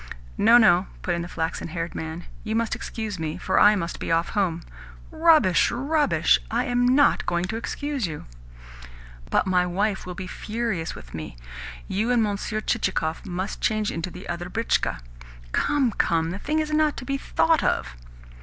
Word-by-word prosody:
"No, 230 +3 +7
no," 195 -5 +5 0.2
put 175 - 0
in 170 - -1
the 170 - -5
flaxen 165 -2 -3
haired 170 +1 -4
man. 160 +2 -5 0.2
"You 220 0 -2
must 230 0 0
excuse 215 -5 -5
me, 160 +1 -3
for 185 - +1
I 210 +1 +7
must 170 -3 -3
be - - -3
off 165 +1 +2
home." 175 -5 -1 0.5
"Rubbish, 315 - +4
rubbish! 270 - +2
I 240 +3 0
am 245 -1 +2
NOT 285 - +3
going 175 0 0
to 195 - -4
excuse 275 0 -3
you." 155 -2 -7 1.0
"But - - +2
my 180 -1 +2
wife 195 +2 -1
will 180 - -5
be 185 - -6
furious 210 -3 -3
with - - -12
me. 80 -6 -7 0.5
You 215 +5 -1
and 240 -2 +3
Monsieur 210 +1 -2
Chichikov 190 -8 -1
must 185 +2 -4
change 215 -2 +1
into 165 +2 -4
the 180 +2 -10
other 175 +1 -4
britchka." 225 - 0 0.5
"Come, 280 - +2
come! 165 -4 +1
The 190 - -5
thing 305 +8 -1
is 310 -1 -1
not 305 -1 +2
to 255 - -6
be 275 0 -2
thought 325 +2 +2
of." - - 0
200 Hz, 180 wpm, -24 LUFS, 175-240 Hz, 1.0 s, No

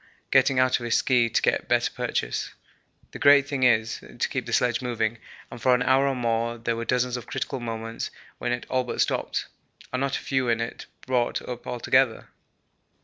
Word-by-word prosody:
getting 135 - +4
out 130 0 +3
of - - -8
his 120 - +2
ski 120 -3 +3
to - - 0
get - - +1
better - - +2
purchase. - - -3 0.6
The - - -8
great 140 -1 +6
thing 140 -2 -3
is 115 -3 +3
to - - -4
keep - - -3
the - - -5
sledge 120 0 +2
moving, 115 -2 -1 0.3
and 120 - -9
for 125 +2 +4
an 125 - 0
hour 135 +1 +3
or 135 - 0
more 115 -1 -1
there 115 0 -2
were 115 0 -4
dozens 125 +1 0
of 120 - -9
critical 135 - -3
moments 115 -1 -4 0.3
when 120 - -2
it 120 0 -2
all 130 0 +1
but 125 - -5
stopped, - - 0 0.5
and 130 - 0
not 135 0 0
a - - -7
few 130 -2 0
in 115 0 +2
it 115 0 -5 0.2
brought 125 -2 0
up 125 -1 -7
altogether. 125 0 +1
120 Hz, 205 wpm, -25 LUFS, 115-130 Hz, 0.6 s, great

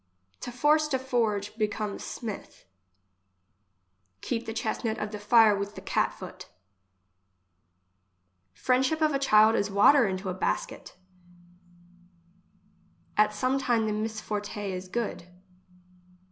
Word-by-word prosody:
To 245 - -6
force 300 +5 +3
to 275 -3 0
forge, 225 -6 -1
becomes 210 -1 -2
smith. 220 -4 -7 1.6
Keep 235 -1 -3
the - - -3
chestnut 225 0 -2
of 210 - -4
the 210 - -6
fire 215 0 +5
with 200 +1 -4
the - - -8
cat - - 0
foot. - - -10 2.0
Friendship 260 - +1
of 310 -2 +2
a 275 - +1
child 220 -4 +5
is 205 - 0
water 210 +6 +5
into 190 +1 -4
a - - -2
basket. 185 - -3 2.2
At 210 0 +4
some 255 +5 0
thing 235 -4 +1
the 215 - -1
misforte 210 -1 -4
is 185 0 -6
good. 220 -3 -3
220 Hz, 120 wpm, -27 LUFS, 205-250 Hz, 2.2 s, fire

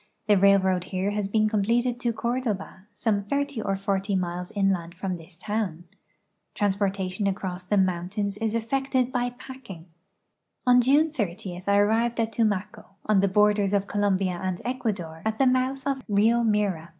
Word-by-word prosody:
The 210 - +5
railroad 190 -2 +4
here 190 +2 -2
has 205 -1 -1
been 215 +1 +2
completed 235 +4 +1
to 240 -1 0
Cordoba, 220 -4 -3
some 205 -1 0
thirty 280 +2 -2
or 195 -2 -1
forty 195 0 -1
miles 180 -1 -3
inland 190 -4 0
from 185 +1 -3
this 165 0 -14
town. 205 -5 -3 0.7
Transportation 195 -1 0
across 190 -2 -3
the 195 +3 0
mountains 190 +2 0
is 225 0 -1
effected 260 +2 0
by 245 -1 0 0.2
})acking. 230 -11 -10 0.8
On 250 0 +6
June 290 +5 +3
30 185 - -4
I 200 0 +4
arrived 225 +3 +2
at 225 0 0
Tumaco, 210 -3 -1 0.2
on 210 -2 +3
the 200 - +3
borders 205 0 +3
of 200 -1 +2
Colombia 195 -3 0
and 185 -2 -2
Ecuador, 205 -11 -3
at 220 0 -1
the 270 - +3
mouth 255 +1 +1
of 275 -1 -1
Rio 220 +3 +3
Mira. 205 -7 0
205 Hz, 160 wpm, -26 LUFS, 190-230 Hz, 0.8 s, On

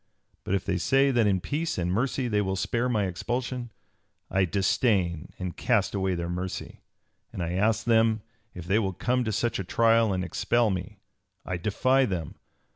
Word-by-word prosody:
But 95 - 0
if 95 - -2
they 95 -2 0
say 135 +7 +3
that 120 -4 +3
in 95 -2 +2
peace 155 - -2
and 90 0 -1
mercy 125 +5 0
they 105 -3 +1
will 95 -1 -1
spare 120 +6 0
me 105 -5 +1
expulsion, 120 +6 -3 0.6
I 95 0 +3
disdain 95 -3 +1
and 90 -2 -5
cast 110 -6 +1
away 95 -2 0
their 85 0 -3
mercy; 90 +1 -5 0.5
and 90 - -4
I 85 - -2
ask 105 +5 +1
them 110 -2 +3 0.3
if 90 -2 -7
they 100 +5 +2
will 95 -4 -1
come 125 +7 0
to 110 - -1
such 110 +2 -1
a - - -1
trial 115 +3 +3
and 90 -1 -1
expel 110 +5 +1
me. 95 +3 -5 0.5
I 90 - -2
defy 130 +9 +2
them. 90 -6 -3
105 Hz, 185 wpm, -27 LUFS, 95-120 Hz, 0.6 s, say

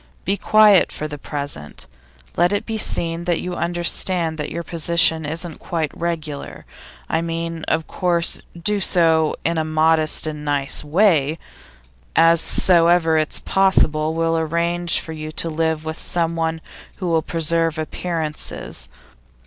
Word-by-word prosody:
Be 195 - +1
very - - -14
quiet 215 -3 +6
for 155 - -5
the 150 -1 -8
present; 140 - -6 0.5
let 175 - +3
it 205 - -1
be 220 -1 -3
seen 170 -3 0
that 175 -2 0
you 180 - -5
understand 170 -1 -1
that 150 - -3
your 170 +2 -5
position 165 -2 +2
isn't 165 +1 -5
quite 160 -4 -3
regular 160 -4 -5 0.4
I 160 - 0
mean, 165 0 -4
of 160 0 0
course, 175 -2 +1 0.2
do 205 +5 0
so 165 -4 +3
in 165 0 0
a - - 0
modest 155 0 +2
and 150 -1 -5
nice 145 -2 +1
way. 160 -2 +2 0.8
As 165 0 +5
soon 170 -3 +3
as - - +5
ever 165 -2 +1
it's 155 -1 0
possible, 160 -5 +2
we'll 165 0 +1
arrange 170 +2 0
for 160 - -7
you 155 0 -7
to 165 - -2
live 160 0 -1
with 160 +1 -5
someone 165 -1 0 0.3
who 185 - -5
will 165 -1 +2
preserve 165 0 +1
appearances. 155 - -4
165 Hz, 150 wpm, -20 LUFS, 155-170 Hz, 0.8 s, quiet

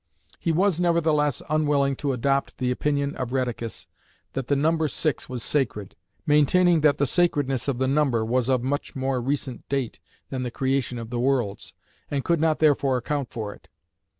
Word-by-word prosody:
He 165 - 0
was 180 +1 +2
nevertheless 160 -5 +2
unwilling 145 -2 +2
to 145 -2 -1
adopt 135 +2 0
the 125 -1 0
opinion 140 +2 -1
of 125 -2 -3
Rheticus 120 -3 -3 0.5
that 135 -2 -3
the 140 - +2
number 160 +2 +2
six 150 +1 -2
was 125 -3 -3
sacred, 110 -9 -1 0.3
maintaining 165 +3 +4
that 145 -1 +4
the 145 - +2
"sacredness" 145 -5 +1
of 135 -3 0
the 130 +1 +1
number 135 -5 +2
was 125 +2 0
of 130 -2 +2
much 140 +2 -2
more 130 -1 -1
recent 135 -1 -3
date 135 -4 -2 0.3
than 130 -2 -2
the 125 - -2
creation 130 0 -1
of 115 0 -7
the 120 - -2
worlds, 125 -5 -1 0.3
and 140 -2 -2
could 170 -2 +2
not 160 -1 +2
therefore 140 -4 +3
account 140 +1 -2
for 105 -3 -5
it. - - -20
140 Hz, 180 wpm, -25 LUFS, 125-150 Hz, 0.5 s, maintaining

